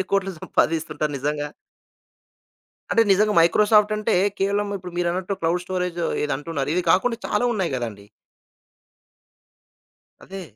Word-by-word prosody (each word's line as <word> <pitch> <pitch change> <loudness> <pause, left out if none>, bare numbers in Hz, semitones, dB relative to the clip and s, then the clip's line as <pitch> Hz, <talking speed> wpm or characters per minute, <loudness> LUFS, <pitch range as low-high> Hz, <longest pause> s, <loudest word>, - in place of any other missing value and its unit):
వేల 190 - 0
కోట్లు 195 -1 0
సంపాదిస్తుంటారు 155 -2 -1
నిజంగా? 145 +1 -2 1.4
అంటే 230 - +5
నిజంగా 210 +2 +3
మైక్రోసాఫ్టంటే 210 +4 +3 0.3
కేవలం 200 +1 0
ఇప్పుడు 180 -2 -9
మీరన్నట్టు 180 +3 -1
క్లౌడ్ 170 +2 0
స్టోరేజ్ 180 -1 -3 0.2
ఏది 150 - -1
అంటున్నారు. 145 -2 -4
ఇది 180 - +1
కాకుండా 230 +4 +2
చాలా 210 +4 0
ఉన్నాయి 190 -7 -1
గదండీ! 105 -5 -6 2.2
అదే. 195 0 -8
180 Hz, 115 wpm, -23 LUFS, 160-205 Hz, 2.2 s, అంటే